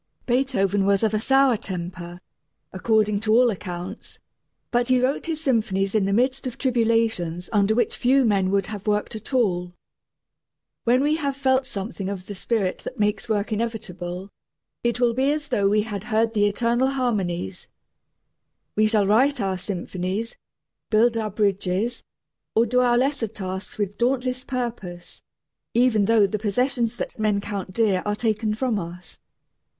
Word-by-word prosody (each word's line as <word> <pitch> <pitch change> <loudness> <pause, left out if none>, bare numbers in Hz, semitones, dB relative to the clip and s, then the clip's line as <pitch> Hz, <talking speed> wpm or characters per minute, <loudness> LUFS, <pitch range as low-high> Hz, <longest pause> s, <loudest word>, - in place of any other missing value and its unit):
Beethoven 215 -7 +1
was 200 +1 +3
of 220 -1 +2
a 215 - +2
sour 270 +1 +4
temper, 175 -4 -5 0.5
according 210 +1 +2
to 215 0 +1
all 240 +1 +5
accounts, 180 0 -7 0.5
but 240 0 +2
he 255 -1 +4
wrote 260 +5 0
his 320 -2 -2
symphonies 210 -6 +1
in 215 -3 +2
the 195 - 0
midst 255 +5 +1
of 250 - -6
tribulations 225 -9 0
under 205 +1 +3
which 240 - +1
few 260 +1 +3
men 195 -4 +2
would 195 -1 +1
have 210 0 -7
worked 210 +2 0
at 220 +4 -8
all. 180 -8 0 1.1
When 250 +3 +4
we 300 +2 +2
have 280 -3 -2
felt 260 -1 +2
something 195 -2 -5
of 190 -2 -5
the 205 - -6
spirit 200 -1 -1
that 260 - -7
makes 210 +2 0
work 210 0 0
inevitable, 195 -4 -4 0.5
it 235 0 0
will 240 -2 +3
be 265 +4 +2
as 295 -1 -3
though 200 -6 +2
we 210 +1 +3
had 205 -2 -5
heard 225 -1 +1
the 205 -2 +3
eternal 235 +4 +1
harmonies. 200 - -2 1.1
We 215 +1 +4
shall 215 -2 +2
write 250 +7 +3
our 190 -3 -1
symphonies, 185 +3 -4 0.5
build 230 +2 +4
our 220 -1 -1
bridges, 200 +2 0 0.5
or 225 - +5
do 250 +2 +2
our 245 -1 +4
lesser 260 -2 +1
tasks 190 -2 -6
with 205 -1 -3
dauntless 255 +1 0
purpose, 225 -9 -5 0.5
even 235 -4 +4
though 220 -1 +5
the 210 +2 -2
possessions 235 +2 0
that - - -5
men 210 -2 +2
count 200 -2 -5
dear 200 -3 +2
are 210 0 -1
taken 215 -1 0
from 230 -2 0
us. 175 0 -9
215 Hz, 160 wpm, -24 LUFS, 195-245 Hz, 1.1 s, all